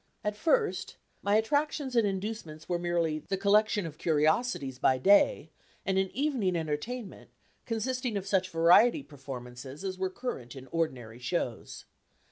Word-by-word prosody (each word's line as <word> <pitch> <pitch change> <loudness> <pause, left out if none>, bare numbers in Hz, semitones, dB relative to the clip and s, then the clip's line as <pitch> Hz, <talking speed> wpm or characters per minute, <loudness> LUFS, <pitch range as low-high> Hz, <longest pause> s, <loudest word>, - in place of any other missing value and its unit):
At 210 0 -1
first, 420 - +1 0.3
my 200 +1 +2
attractions 285 +3 0
and 230 -3 +4
inducements 190 -6 -5
were 175 -1 0
merely 170 -3 0
the 195 +5 -3
collection 210 0 +3
of 155 -1 -8
curiosities 155 - +1
by 130 - +3
day, 200 - +4 0.3
and 190 -1 +2
an 190 0 0
evening 255 -10 0
entertainment, 170 +9 -4 0.4
consisting 245 0 -1
of 195 - -4
such 190 -2 +1
variety 180 - +5
performances 130 - -9
as 185 -1 -4
were 190 0 0
current 185 - -6
in 130 -1 -9
ordinary 125 -9 -2
shows. 125 -3 -3
190 Hz, 140 wpm, -30 LUFS, 155-225 Hz, 0.4 s, variety